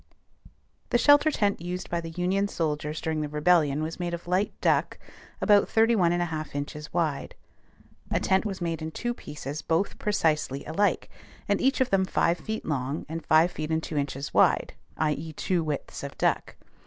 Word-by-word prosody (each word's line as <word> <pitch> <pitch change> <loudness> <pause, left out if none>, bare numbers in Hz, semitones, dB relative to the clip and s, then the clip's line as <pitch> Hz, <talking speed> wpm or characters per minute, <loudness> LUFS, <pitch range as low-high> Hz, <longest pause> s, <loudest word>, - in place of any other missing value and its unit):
The - - +3
shelter 290 +4 +6
tent 205 - 0
used 180 +1 -4
by 170 0 -2
the 165 - -6
Union 185 +4 0
soldiers 155 -4 -2
during 160 -1 -2
the 150 - -3
Rebellion 150 -1 +2
was 165 +3 -5
made 175 -1 -2
of 170 - -12
light 185 +3 +1
duck - - +1 0.4
about 205 -2 +4
31 220 -6 +3
1/2 160 -4 -2
inches 150 +1 -5
wide. 155 -5 -1 0.7
A - - +1
tent 190 0 +2
was 195 -4 -4
made 165 -2 -2
in 160 - -3
two 240 +9 -3
pieces 150 - -7
both 165 +6 -1
precisely 155 -9 0
alike, 200 +7 +1 0.4
and - - +1
each 265 0 +2
of 260 - +1
them 190 -1 +3
five 175 -2 +1
feet 220 +4 -5
long 140 0 -2
and 160 +1 -5
five 160 +3 +4
feet 155 -2 -5
and 160 0 0
two 155 - -5
inches 140 0 -3
wide; - - +3 0.2
i.e., 155 +1 -1
two 175 +2 0
widths 150 -3 -4
of - - -7
duck. - - 0
165 Hz, 180 wpm, -27 LUFS, 150-190 Hz, 0.7 s, shelter